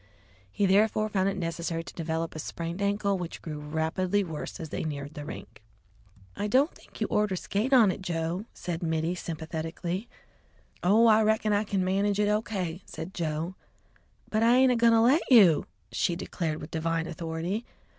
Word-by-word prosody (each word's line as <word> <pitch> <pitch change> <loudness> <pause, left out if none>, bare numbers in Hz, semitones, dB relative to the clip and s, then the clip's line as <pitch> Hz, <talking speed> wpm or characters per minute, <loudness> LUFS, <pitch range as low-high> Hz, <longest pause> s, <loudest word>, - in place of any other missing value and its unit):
He 205 - +1
therefore 215 +2 +3
found 195 -2 +1
it 195 - -3
necessary 165 -1 -3
to - - -10
develop 165 0 -3
a 155 - -6
sprained 170 +4 -5
ankle, 200 -1 +1
which 175 -1 -5
grew 155 -2 -6
rapidly 160 +6 0
worse 160 +1 -6
as 160 -3 -6
they - - -3
neared 145 -2 -5
the 150 - -7
rink. - - -9 0.7
"I 205 - -2
don't 265 - +3
think - - -16
you - - +3
orter 210 -2 +2
skate 205 +7 -2
on 235 -7 +6
it, 190 - -6
Joe!" 170 +2 -2
said 175 -1 -5
Mittie 160 0 0
sympathetically. 170 +4 -4 0.7
"Oh, 210 +6 +5
I 220 -1 +6
reckon 215 0 +2
I 205 +1 +1
kin 195 -2 0
manage 200 +2 +1
it 210 - +3
all 210 0 +3
O.K.," 185 -5 -4
said 175 +4 -8
Joe. 160 +1 -2 0.7
"But 215 - 0
I 235 +2 +5
ain't 260 0 +5
agoin' 235 -1 +4
to 225 - +5
let 265 +8 +5
you!" 195 -10 +7 0.2
she 175 - 0
declared 165 -3 -3
with 150 - -8
divine 165 0 -1
authority. 170 +5 -3
185 Hz, 180 wpm, -28 LUFS, 165-210 Hz, 0.7 s, you